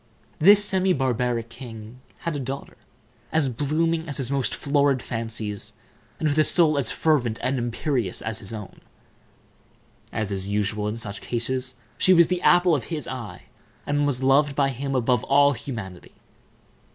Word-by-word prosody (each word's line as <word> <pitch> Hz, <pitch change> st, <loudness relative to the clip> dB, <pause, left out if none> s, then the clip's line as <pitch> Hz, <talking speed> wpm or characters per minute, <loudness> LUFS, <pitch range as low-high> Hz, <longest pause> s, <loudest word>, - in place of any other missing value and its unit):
This 205 Hz, +5 st, +6 dB
semi 190 Hz, -1 st, +2 dB
barbaric 125 Hz, -4 st, -1 dB
king 115 Hz, 0 st, -10 dB, 0.2 s
had 170 Hz, -3 st, -3 dB
a -, -, -2 dB
daughter 135 Hz, +1 st, -6 dB, 0.6 s
as 155 Hz, -4 st, +2 dB
blooming 160 Hz, +6 st, -1 dB
as 140 Hz, -, -2 dB
his 135 Hz, -1 st, 0 dB
most 135 Hz, -2 st, 0 dB
florid 140 Hz, -3 st, +1 dB
fancies, 110 Hz, -2 st, -4 dB, 0.5 s
and 155 Hz, -, +1 dB
with 150 Hz, +1 st, +1 dB
a -, -, +6 dB
soul 160 Hz, -2 st, +4 dB
as 135 Hz, -, +1 dB
fervent 125 Hz, -8 st, +1 dB
and 130 Hz, 0 st, 0 dB
imperious 120 Hz, -, -2 dB
as 110 Hz, 0 st, -2 dB
his 100 Hz, -, -4 dB
own. 105 Hz, -3 st, -8 dB, 1.3 s
As 110 Hz, -3 st, -3 dB
is 95 Hz, -1 st, -2 dB
usual 105 Hz, +1 st, -1 dB
in 105 Hz, +2 st, -3 dB
such 100 Hz, -3 st, -5 dB
cases, 125 Hz, +2 st, -2 dB, 0.2 s
she 185 Hz, -, +5 dB
was 170 Hz, -1 st, +6 dB
the 180 Hz, -1 st, -1 dB
apple 175 Hz, -1 st, +5 dB
of 140 Hz, -7 st, 0 dB
his 155 Hz, -4 st, -4 dB
eye, 125 Hz, -5 st, -7 dB, 0.4 s
and 145 Hz, 0 st, +1 dB
was 135 Hz, -2 st, 0 dB
loved 140 Hz, +2 st, +3 dB
by 140 Hz, -1 st, +2 dB
him 135 Hz, +1 st, -3 dB
above 125 Hz, -1 st, +1 dB
all 140 Hz, +1 st, +4 dB
humanity. 110 Hz, -8 st, -8 dB
130 Hz, 165 wpm, -24 LUFS, 115-145 Hz, 1.3 s, This